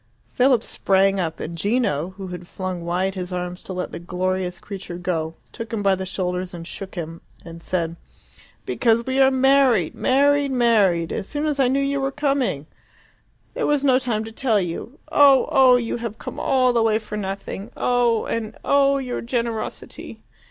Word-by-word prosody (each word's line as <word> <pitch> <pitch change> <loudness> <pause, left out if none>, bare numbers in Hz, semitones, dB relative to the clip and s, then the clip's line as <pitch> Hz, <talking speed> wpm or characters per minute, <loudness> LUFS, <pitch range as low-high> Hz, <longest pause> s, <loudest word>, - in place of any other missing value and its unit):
Philip 250 -2 +3
sprang 195 0 +2
up, 165 -3 -2
and 170 - -5
Gino, 190 - 0
who 190 -2 -6
had 180 -1 -8
flung 185 -2 -5
wide 180 +3 -1
his 185 -1 -5
arms 180 0 -4
to 190 - -7
let 180 0 -4
the - - -6
glorious 180 +1 -2
creature 185 -2 -7
go, 165 -3 -2 0.2
took 230 -1 -7
him 220 -3 -2
by 195 -1 +4
the 190 0 -3
shoulders 180 -1 -3
and 165 -1 -8
shook 195 +2 -8
him, 165 -1 -6 0.2
and 165 0 -10
said, 170 -1 -2 0.7
"Because 230 -1 +2
we 260 +1 0
are 265 0 +7
married 265 - +3
married 285 +1 +2
married 210 -9 +2
as 195 - -4
soon 295 +1 -2
as 295 -2 -1
I 265 - +4
knew 265 +2 +1
you 280 0 -1
were, 270 0 -1
coming. 275 - 0 0.9
There - - -1
was 295 -2 +1
no 260 -2 +4
time 230 -4 -1
to 225 - -8
tell 225 -2 +1
you. 185 - -5
Oh. 280 -3 +6
oh! 260 -2 +6
You 240 -1 -1
have 230 -2 -5
come - - -7
all 255 -2 +2
the 235 - +3
way 220 -1 +3
for 210 -1 -7
nothing. 195 +1 -5
Oh! 240 -2 +2
And 225 -2 -4
oh, 280 0 +4
your 255 -3 -3
generosity!" 235 -2 -4
215 Hz, 185 wpm, -22 LUFS, 180-255 Hz, 0.9 s, are